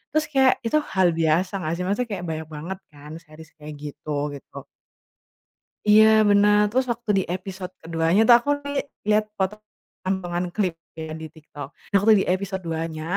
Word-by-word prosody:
Terus 310 - +3
kayak 265 -2 +5
itu 265 +7 +2
hal 190 - +1
biasa 165 +3 +1
nggak 160 -1 -2
sih? 180 - -4
Maksudnya 220 +5 -1
kayak 185 -3 -4
banyak 160 0 -4
banget 175 +6 -6
kan 150 +1 -13
series 155 0 -15
kayak 150 0 -9
gitu, 145 0 -4
gitu. - - -12 1.3
Iya 215 +1 +8 0.2
benar. 205 +1 +5
Terus 260 +2 +1
waktu 230 -2 -6
di 190 - 0
episode 185 0 -7
keduanya 165 +4 +1
tuh 240 - +9
aku 285 - -5
li 285 0 -2 0.3
lihat 215 0 +4
poto 190 +2 -1 0.5
potongan 180 -2 -2
klip 190 -5 0 0.2
kayak 160 -1 -6
di 160 - -6
TikTok. 145 -3 -10 0.2
Nah 200 - -1
waktu 220 +3 +5
di - - -6
episode 190 0 -3
2-nya, 160 -1 -4
185 Hz, 175 wpm, -23 LUFS, 160-210 Hz, 1.3 s, tuh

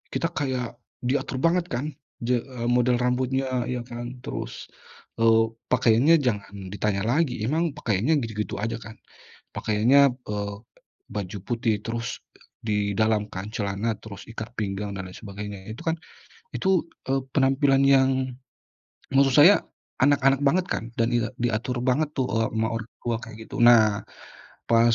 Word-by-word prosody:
kita 165 +1 0
kayak 130 -6 -3 0.2
diatur 130 0 -1
banget 175 +1 +3
kan 140 +6 -2 0.3
je 120 0 +2
eee, 125 -3 -5
model 125 0 +3
rambutnya, 130 0 0
iya 125 -1 -2
kan 120 +1 -6
terus, - - -6 0.5
eee, 115 0 +5 0.3
pakaiannya 125 +6 +5
jangan 105 -5 -1 0.2
ditanya 100 -1 0
lagi, 145 +1 +1
emang 160 +3 +1
pakaiannya 115 +9 +1
gitu-gitu 105 -2 -4
aja 115 +2 -2
kan. 110 0 -10 0.6
Pakaiannya, 125 +5 +4
eee, 100 -1 -3 0.6
baju 100 -2 -4
putih 115 -3 0
terus 115 -1 -3 0.5
di 105 -2 0
dalam 110 -1 +2
kan 95 +1 -5
celana, 100 +2 -1
terus 100 -3 -9
ikat 115 0 -7
pinggang, 100 -1 -3
dan 95 - -4
lain 90 - -10
sebagainya. 100 -1 -8
Itu 110 - -8
kan 165 - +2 0.6
itu, 190 -4 +2 0.2
eee, 135 0 +2 0.2
penampilan 135 0 +4
yang 135 -1 +5 1.0
maksud 135 -1 +5
saya 185 +7 +7 0.4
anak-anak 140 -1 +4
banget 180 +6 +3
kan - - -2 0.2
dan 115 - +3
e 120 -2 +2 0.2
diatur 120 +1 -1
banget 140 +4 +1
tuh, 130 -1 +1
eee, 115 -1 +1
sama 110 0 0
orang 115 0 -5
tua 120 -1 -1
kayak 115 -2 -9
gitu. - - -7
Nah, 110 -4 +6 0.7
pas 115 0 +5
120 Hz, 145 wpm, -25 LUFS, 110-135 Hz, 1.0 s, saya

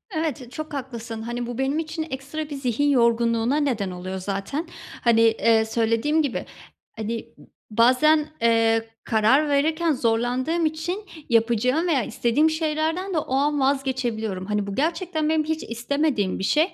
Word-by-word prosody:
Evet, 290 -6 -3
çok 310 +3 -6
haklısın. 235 -4 -5
Hani, 240 +2 -4
bu 240 -1 -5
benim 270 +3 0
için 320 0 -3
ekstra 285 +3 -5
bir 290 - -5
zihin 270 +1 0
yorgunluğuna 235 0 +2
neden 240 -10 0
oluyor 185 +1 -5
zaten. 200 - -3 0.4
Hani, 230 -1 +4
eee, 225 0 +4
söylediğim 230 +7 +1
gibi, 285 -5 -2 0.5
hani, 225 +1 -3
m - - -16
ı - - -20 0.2
bazen, 260 +7 +4
eee, 225 -1 +3
karar 240 +7 +3
verirken 315 +4 +2
zorlandığım 250 +6 0
için 335 +6 -3 0.2
yapacağım 240 +7 +2
veya 285 -8 +2
istediğim 245 +9 +2
şeylerden 320 +4 -1
de - - 0
o 265 - -3
an 290 +2 +1
vazgeçebiliyorum. 250 -8 -1
Hani, 210 0 -1
bu 200 - -4
gerçekten 325 +1 -1
benim 315 -1 +2
hiç 315 +1 -2
istemediğim 240 -3 -1
bir - - -3
şey. 310 - +2
260 Hz, 155 wpm, -24 LUFS, 230-310 Hz, 0.5 s, Hani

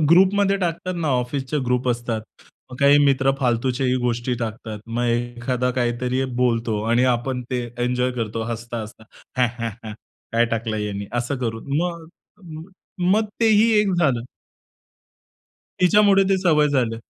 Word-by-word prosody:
ग्रुपमध्ये 195 +3 +4
टाकतात 180 0 -2
ना, 165 -3 -1
ऑफिसचे 130 +2 -1
ग्रुप 125 +1 0
असतात. 120 -2 -2 0.5
मग 125 - -8
काही 140 +1 +6
मित्र 135 -1 +3
फालतूच्याही 125 0 0
गोष्टी 120 +1 -1
टाकतात. 110 -1 -5
मग 115 +1 -2
एखादा 120 +1 -1
काहीतरी 125 +2 0 0.2
बोलतो 115 -3 0
आणि 120 +2 +3
आपण 125 +1 0
ते 125 -1 -1 0.2
एन्जॉय 125 +1 0
करतो, 115 -2 -3
हसता-हसता. 115 -1 -6 0.3
ह्या, 125 -1 +4
ह्या, 115 0 -2
ह्या 110 -1 -7 0.4
काय 115 +1 +3
टाकलं 115 -1 -2
ह्यांनी 100 -1 -4
असं 120 +4 -2
करून. 115 +2 -4
मग 170 -2 -3 0.4
म 160 -2 -8 0.5
मग 220 +2 +3 0.2
तेही 225 0 +5
एक 200 -2 +1
झालं. 135 -9 +2 1.6
तिच्यामुळे 195 +2 +5
ते 195 - +3
सवय 150 -5 +4
झालं. 120 -5 0
125 Hz, 140 wpm, -22 LUFS, 115-150 Hz, 1.6 s, काही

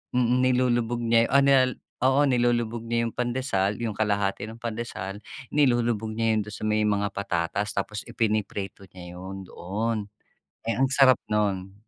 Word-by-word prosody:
mm, 125 0 +3
nilulubog 120 -2 +2
niya 115 0 +4
o 140 0 +5
nilalag 130 -2 +4 0.3
o - - +5
oo, - - +5
nilulubog 120 -2 +1
niya 115 0 0
yong - - -8
pandesal. 120 -5 -1
Yong 110 -3 -3
kalahati 100 -2 0
ng 110 +2 -8
pandesal 110 -4 -5 0.2
nilulubog 120 -6 +1
niya 110 0 +1
'yon - - +2
do'n 105 - -10
sa 105 - -8
may 110 0 +2
mga 100 -1 +1
patatas, 100 +1 -1
tapos 105 +2 -3
ipiniprito 105 -4 -2
niya 90 -1 -10
'yon 95 +1 -8
doon. 110 +7 -3 0.6
Eh, 115 0 -2
ang 135 - +4
sarap 130 -2 +6
no'n. 100 -3 -1
110 Hz, 160 wpm, -26 LUFS, 100-120 Hz, 0.6 s, sarap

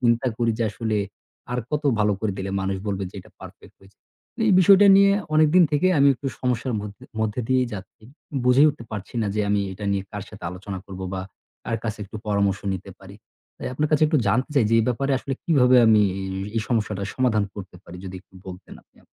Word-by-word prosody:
চিন্তা 120 +1 +2
করি 115 -1 +2
যে, 115 - +1
আসলে 110 0 -2 0.6
আর 125 - -1
কতো 150 0 -1
ভালো 105 -1 +2
করে 110 -3 -1
দিলে 95 0 -4
মানুষ 95 0 -2
বলবে 100 -1 -2
যে - - -28
এটা - - -19
perfect - - -13
হয়েছে? 95 +1 -21 0.5
এই 210 - +4
বিষয়টা 195 +2 +7
নিয়ে 200 0 +6 0.2
অনেকদিন 155 +3 +5
থেকে 150 +5 +2
আমি 140 - +6
একটু 135 +2 -8
সমস্যার 125 0 -1
মধ্যে 105 0 -9 0.2
মধ্যে 110 +2 -1
দিয়েই 130 -1 +2
যাচ্ছি। 100 +1 -9 0.4
বুঝে 125 +3 +5
উঠতে 140 -5 -5
পারছি 105 +1 -7
না 105 - -1
যে 105 - 0
আমি 105 0 +2
এটা 100 +2 -8
নিয়ে 100 - -1
কার 105 - -5
সাথে 105 - -12
আলোচনা 95 +1 -7
করব? 95 -1 -9
বা 95 - -3 0.4
কার 115 - -1
কাছে 110 -1 -3
একটু 105 - -9
পরামর্শ 100 -1 +1
নিতে 95 +1 -8
পারি? 95 0 -13 0.4
তাই - - -5
আপনার 150 +3 0
কাছে 155 0 +2
একটু 150 -1 +2
জানতে 125 +9 +1
চাই 135 - +4
যে - - +3
এই 115 - +2
ব্যাপারে 135 +3 0
আসলে 135 0 -4
কিভাবে 130 -6 +4
আমি 110 -1 +5 0.2
ই - - -4 0.3
এই 110 - +1
সমস্যাটার 105 -4 -1
সমাধান 120 -5 +1
করতে 95 -2 -9
পারি? 90 - -11
যদি 95 - -7
একটু - - -31
বলতেন 90 -1 -10
আপনি - - -43
আম - - -27
110 Hz, 215 wpm, -23 LUFS, 100-130 Hz, 0.6 s, বিষয়টা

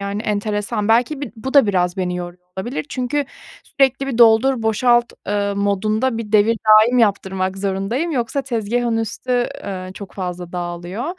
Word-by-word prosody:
yani 200 +2 -3
enteresan. 210 +1 -2
Belki 245 +6 +2
b 285 - -5
bu 265 +5 -6
da 275 -6 +7
biraz 180 -2 0
beni 180 -1 -2
yoruyor 175 0 -7 0.2
olabilir 245 +8 -4
çünkü 275 +3 -1 0.4
sürekli 270 0 +1
bir 245 -3 -3
doldur 235 +2 +5
boşalt, 240 +2 +2 0.2
ııı, 200 -1 -1
modunda 215 +4 0
bir 220 -2 -6
devridaim 220 +2 +5
yaptırmak 190 -3 0
zorundayım 200 - -2
yoksa 270 0 -1
tezgâhın 235 -1 -1
üstü, 240 +3 -1 0.2
ııı, 185 -2 -6
çok 200 -1 -10
fazla 180 -2 -5
dağılıyor. 175 +5 -5
215 Hz, 150 wpm, -19 LUFS, 195-245 Hz, 0.4 s, da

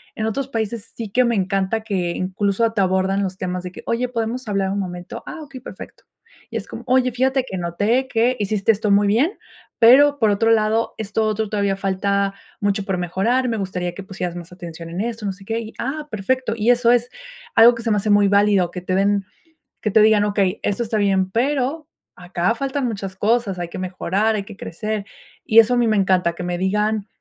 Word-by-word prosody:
En 220 - -2
otros 270 +5 -2
países, 225 -2 -4
sí 225 -3 -5
que 250 +5 +3
me 235 - +1
encanta 195 +3 0
que, 190 -5 -2
incluso, 200 +5 0
te 210 -3 0
abordan 190 +1 +1
los 190 -1 -4
temas 180 -1 -3
de 180 - -6
que: - - -10
"Oye, 240 +2 0
¿podemos 235 +1 -3
hablar 195 -2 0
un 200 - -2
momento?", 180 -2 -6
"Ah, 320 - -7
okey, 275 -4 -10
perfecto", - - -11 0.5
y 225 - -2
es 210 - -6
como: 235 - -8
"Oye, 255 0 +3
fíjate 260 +2 +1
que 190 - -4
noté 205 +10 0
que, 245 +1 +1
hiciste 210 +1 +2
esto 210 0 -1
muy 200 0 +4
bien, 250 - +3 0.5
pero, 285 +5 +7
por 220 - +3
otro 215 +3 +2
lado, 220 +1 +2
esto 220 0 -1
otro 215 -1 -1
todavía 200 -2 0
falta 195 +1 0 0.3
mucho 200 0 0
por 190 -2 -1
mejorar, 220 +9 0
me 225 - -1
gustaría 180 -3 -3
que 195 - -7
pusieras 185 -3 -5
más 175 0 -9
atención 170 -2 -9
en 175 +3 -3
esto", 230 -1 -4
no 195 - 0
sé 195 +1 -16
qué 225 +2 -2
y: 225 -1 -8
"Ah 300 +3 -3
perfecto", 240 +4 -1
y 225 +2 0
eso 240 -1 +4
es, 245 0 +2 0.5
algo 230 +2 +8
que 230 - -7
se 230 - -2
me 210 - +2
hace 205 +1 0
muy 205 0 +5
válido, 200 -3 +3
que 180 0 -7
te 185 +1 -3
den 200 +1 +2 0.6
que 215 - -2
te 220 - +6
digan: 215 -1 +5
"Okey, 200 -2 0
esto 205 +3 0
está 220 -1 -1
bien, 190 -2 +1
pero, 275 +6 0 0.3
acá 180 +3 -1
faltan 275 -1 -2
muchas 195 -4 -5
cosas, 205 -1 0
hay 175 - -3
que - - -8
mejorar, 190 +4 0
hay 205 - -1
que 200 -1 -11
crecer", 215 +4 -4 0.4
y 225 +1 +7
eso 240 +3 +2
a - - +1
mí 240 -1 +3
me 215 -1 +2
encanta, 185 -3 +2
que 180 - -7
me 175 0 -2
digan, 210 +2 0
210 Hz, 220 wpm, -21 LUFS, 190-230 Hz, 0.6 s, algo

